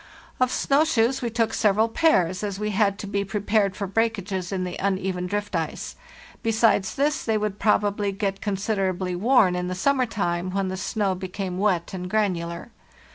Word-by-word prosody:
Of 255 Hz, 0 st, +2 dB
snow 280 Hz, +2 st, +3 dB
shoes 265 Hz, -4 st, +1 dB
we 240 Hz, -, -1 dB
took 225 Hz, 0 st, 0 dB
several 215 Hz, +1 st, +3 dB
pairs, 190 Hz, -, +2 dB
as 200 Hz, -1 st, -3 dB
we 210 Hz, 0 st, -1 dB
had 200 Hz, -1 st, +2 dB
to 215 Hz, -, -6 dB
be 200 Hz, 0 st, -1 dB
prepared 200 Hz, 0 st, 0 dB
for 200 Hz, -, -3 dB
breakages 195 Hz, -3 st, -1 dB
in 190 Hz, -2 st, -1 dB
the 180 Hz, -1 st, -4 dB
uneven 190 Hz, -2 st, -1 dB
drift 205 Hz, 0 st, -3 dB
ice; 165 Hz, -2 st, -3 dB, 0.5 s
besides 225 Hz, -4 st, +2 dB
this, 295 Hz, +3 st, +1 dB
they 220 Hz, -2 st, +1 dB
would 210 Hz, -1 st, -3 dB
probably 205 Hz, -1 st, +1 dB
get 195 Hz, 0 st, -3 dB
considerably 195 Hz, -3 st, -1 dB
worn 210 Hz, -2 st, +4 dB
in 180 Hz, 0 st, -2 dB
the 185 Hz, -, -3 dB
summer 260 Hz, +6 st, +2 dB
time 175 Hz, -4 st, -2 dB
when 195 Hz, -1 st, 0 dB
the 185 Hz, -, -3 dB
snow 195 Hz, +1 st, -1 dB
became 185 Hz, 0 st, -5 dB
wet 190 Hz, -4 st, 0 dB
and 180 Hz, -1 st, -5 dB
granular. 180 Hz, -2 st, -1 dB
200 Hz, 180 wpm, -24 LUFS, 185-220 Hz, 0.5 s, worn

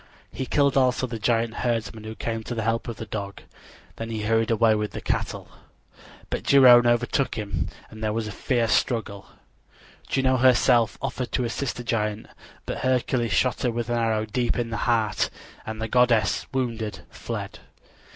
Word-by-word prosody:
He 130 Hz, -, -5 dB
killed 140 Hz, 0 st, +2 dB
also 130 Hz, -1 st, +2 dB
the 115 Hz, -2 st, -6 dB
giant 115 Hz, +1 st, +1 dB
herdsman 115 Hz, -2 st, -2 dB
who 110 Hz, 0 st, -6 dB
came 115 Hz, 0 st, -3 dB
to 120 Hz, -, -4 dB
the 115 Hz, -, -2 dB
help 115 Hz, +2 st, -1 dB
of 115 Hz, -, -4 dB
the 110 Hz, -, -6 dB
dog. 100 Hz, -2 st, -6 dB, 0.5 s
Then 115 Hz, 0 st, -5 dB
he 110 Hz, -2 st, -3 dB
hurried 115 Hz, +1 st, +1 dB
away 115 Hz, -1 st, +4 dB
with 105 Hz, 0 st, -2 dB
the -, -, -4 dB
cattle. -, -, -3 dB, 0.8 s
But -, -, -2 dB
Geryone 125 Hz, -3 st, +7 dB
overtook 125 Hz, +2 st, +1 dB
him 105 Hz, -2 st, -3 dB, 0.2 s
and 110 Hz, 0 st, -9 dB
there 110 Hz, -, +1 dB
was 110 Hz, 0 st, -2 dB
a -, -, -5 dB
fierce 115 Hz, +2 st, 0 dB
struggle. 110 Hz, -5 st, -1 dB, 0.8 s
Juno 130 Hz, -1 st, +2 dB
herself 120 Hz, -2 st, +4 dB
offered 125 Hz, -2 st, -3 dB
to 125 Hz, -, +1 dB
assist 125 Hz, +3 st, -3 dB
the 120 Hz, -, -6 dB
giant; 105 Hz, -2 st, -1 dB, 0.4 s
but -, -, -4 dB
Hercules 125 Hz, -2 st, 0 dB
shot 125 Hz, -, +1 dB
her 125 Hz, -, +1 dB
with 120 Hz, 0 st, -3 dB
an 120 Hz, -, +1 dB
arrow 110 Hz, -2 st, +1 dB
deep 120 Hz, +2 st, -1 dB
in 120 Hz, -1 st, -2 dB
the 115 Hz, -, -2 dB
heart, 110 Hz, -4 st, +1 dB, 0.4 s
and 110 Hz, 0 st, -5 dB
the 110 Hz, -, -2 dB
goddess, 120 Hz, -3 st, +2 dB
wounded, 115 Hz, -5 st, -3 dB
fled. -, -, -6 dB
115 Hz, 180 wpm, -25 LUFS, 110-125 Hz, 0.8 s, Geryone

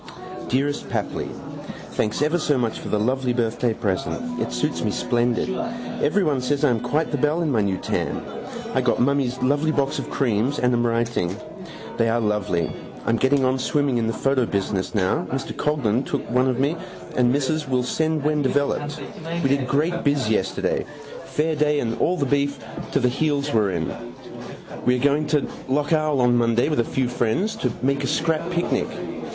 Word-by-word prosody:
Dearest 140 Hz, +3 st, 0 dB
Papli -, -, -2 dB, 0.6 s
Thanks 110 Hz, +6 st, 0 dB
ever 155 Hz, +4 st, +2 dB
so 150 Hz, -3 st, +2 dB
much 115 Hz, -3 st, -1 dB
for -, -, -7 dB
the 105 Hz, -, +1 dB
lovely 130 Hz, +3 st, +1 dB
birthday 120 Hz, 0 st, 0 dB
present. 110 Hz, -, -2 dB
It -, -, -1 dB
suits 150 Hz, 0 st, -1 dB
me 110 Hz, -, +1 dB
splendid. 120 Hz, +2 st, +1 dB, 0.6 s
Everyone 150 Hz, -5 st, +2 dB
says 140 Hz, +3 st, 0 dB
I 140 Hz, -, +4 dB
am 115 Hz, -, +1 dB
quite 145 Hz, +7 st, 0 dB
the 145 Hz, -, -1 dB
belle 150 Hz, +5 st, +2 dB
in 155 Hz, -, 0 dB
my 115 Hz, -4 st, +3 dB
new 100 Hz, -2 st, 0 dB
tam. -, -, -2 dB, 0.5 s
I -, -, +2 dB
got -, -, +1 dB
mummy's 130 Hz, -1 st, +2 dB
lovely 145 Hz, +4 st, +2 dB
box 140 Hz, -1 st, 0 dB
of -, -, -5 dB
creams 125 Hz, +2 st, +1 dB
and 125 Hz, 0 st, +2 dB
am 120 Hz, 0 st, +2 dB
writing. 115 Hz, -6 st, 0 dB, 0.6 s
They 115 Hz, 0 st, +3 dB
are 115 Hz, +1 st, +2 dB
lovely. 105 Hz, -6 st, 0 dB, 0.3 s
I -, -, +2 dB
am 115 Hz, -, +2 dB
getting 130 Hz, +2 st, +3 dB
on 130 Hz, +1 st, +1 dB
swimming 135 Hz, -1 st, +1 dB
in 115 Hz, -, 0 dB
the 115 Hz, -, 0 dB
photo 135 Hz, -2 st, +1 dB
business 100 Hz, +1 st, -1 dB
now. 95 Hz, -3 st, +1 dB
Mr 135 Hz, +1 st, -3 dB
Coghlan 135 Hz, -5 st, +1 dB
took -, -, -3 dB
one 125 Hz, +1 st, +3 dB
of 125 Hz, -1 st, 0 dB
me 140 Hz, +5 st, +2 dB, 0.4 s
and 125 Hz, -1 st, +4 dB
Mrs. 145 Hz, +2 st, 0 dB
Will 125 Hz, -1 st, +2 dB
send 155 Hz, +3 st, 0 dB
when 150 Hz, 0 st, +2 dB
developed. 145 Hz, +2 st, 0 dB, 0.4 s
We 135 Hz, -, +3 dB
did 135 Hz, -2 st, +1 dB
great 165 Hz, +6 st, +1 dB
biz 140 Hz, -6 st, +2 dB
yesterday. 95 Hz, -3 st, 0 dB, 0.4 s
Fair 155 Hz, +1 st, 0 dB
day 150 Hz, 0 st, +2 dB
and 115 Hz, -3 st, -1 dB
all 180 Hz, -, +2 dB
the 145 Hz, -, +1 dB
beef 140 Hz, +1 st, +1 dB, 0.4 s
to -, -, +3 dB
the 125 Hz, -, +3 dB
heels 145 Hz, +2 st, 0 dB
were 105 Hz, -3 st, +3 dB
in. 85 Hz, -4 st, -4 dB, 0.7 s
We 125 Hz, -, +3 dB
are 125 Hz, -, -2 dB
going 145 Hz, +1 st, +3 dB
to 150 Hz, -2 st, +1 dB, 0.2 s
lough 145 Hz, +4 st, 0 dB
Owel 155 Hz, -4 st, +2 dB
on 125 Hz, 0 st, +4 dB
Monday 120 Hz, +3 st, +2 dB
with 150 Hz, -, 0 dB
a -, -, +4 dB
few 130 Hz, +2 st, -1 dB
friends 120 Hz, -, 0 dB
to 125 Hz, -, 0 dB
make 140 Hz, +1 st, +1 dB
a -, -, 0 dB
scrap 165 Hz, +4 st, 0 dB
picnic. 175 Hz, 0 st, 0 dB
130 Hz, 190 wpm, -23 LUFS, 120-145 Hz, 0.7 s, I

